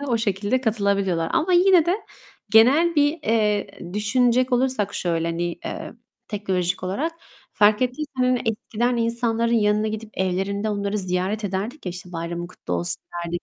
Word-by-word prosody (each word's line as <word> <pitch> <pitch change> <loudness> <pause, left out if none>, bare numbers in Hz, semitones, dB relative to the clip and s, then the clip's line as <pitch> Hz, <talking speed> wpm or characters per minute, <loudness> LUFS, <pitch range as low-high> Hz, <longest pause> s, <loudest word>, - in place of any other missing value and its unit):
hı - - -4
hı, - - -4
o - - +4
şekilde 205 +3 0
katılabiliyorlar. 200 -7 0
Ama 330 +3 +1
yine 355 -2 +5
de 355 +3 +2 0.5
genel 280 +10 +5
bir, 295 +1 +2
eee, 210 -4 +1 0.3
düşünecek 245 +4 +2
olursak 245 -5 +1
şöyle, 165 -2 -1
hani, 170 +1 -2 0.2
eee, - - -5 0.4
teknolojik 185 -4 -1
olarak 235 - -2 0.4
fark 210 +2 +4
ettiysen, 255 +4 -2
hani, 250 -1 +2
eskiden 230 +2 -1
insanların 230 0 0
yanına 210 -1 +2
gidip 215 0 -6
evlerinde 195 +3 -1
onları 200 0 -1
ziyaret 185 +3 -1
ederdik 205 +7 -4
ya, - - -1
işte, 180 0 -9
"Bayramın 170 +1 -4
kutlu 175 - -8
olsun." 85 0 -3 0.2
derdik. 170 +1 -4
210 Hz, 155 wpm, -23 LUFS, 190-250 Hz, 0.5 s, yine